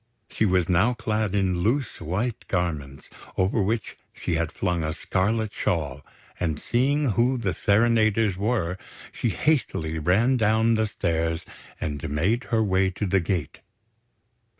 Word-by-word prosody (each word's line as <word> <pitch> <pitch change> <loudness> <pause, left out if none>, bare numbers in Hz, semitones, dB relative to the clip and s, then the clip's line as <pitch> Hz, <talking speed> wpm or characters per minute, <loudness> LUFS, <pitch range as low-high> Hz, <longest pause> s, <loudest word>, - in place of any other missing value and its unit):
She 110 - +1
was 90 -2 +2
now 95 +8 +3
clad 110 -3 -1
in 95 -3 +1
loose 120 +6 0
white 105 +8 -3
garments, 75 -7 -3 0.3
over 95 +3 +2
which 110 +2 -2
she - - -4
had 80 0 0
flung 90 -3 -1
a 80 0 -1
scarlet 105 +5 0
shawl; 70 -5 -2 0.4
and 80 -4 -1
seeing 135 +2 +1
who 120 +5 +2
the 105 -6 -1
serenaders 110 -1 +3
were, 95 -3 -1 0.3
she 120 - -1
hastily 85 - 0
ran 105 - +3
down 110 +1 +3
the 110 -1 +1
stairs 80 -3 -1 0.3
and 75 0 -3
made 95 - 0
her 115 -2 +1
way 95 -1 +2
to 95 +3 -3
the 95 0 +2
gate. 85 -4 -2
95 Hz, 145 wpm, -25 LUFS, 85-115 Hz, 0.4 s, now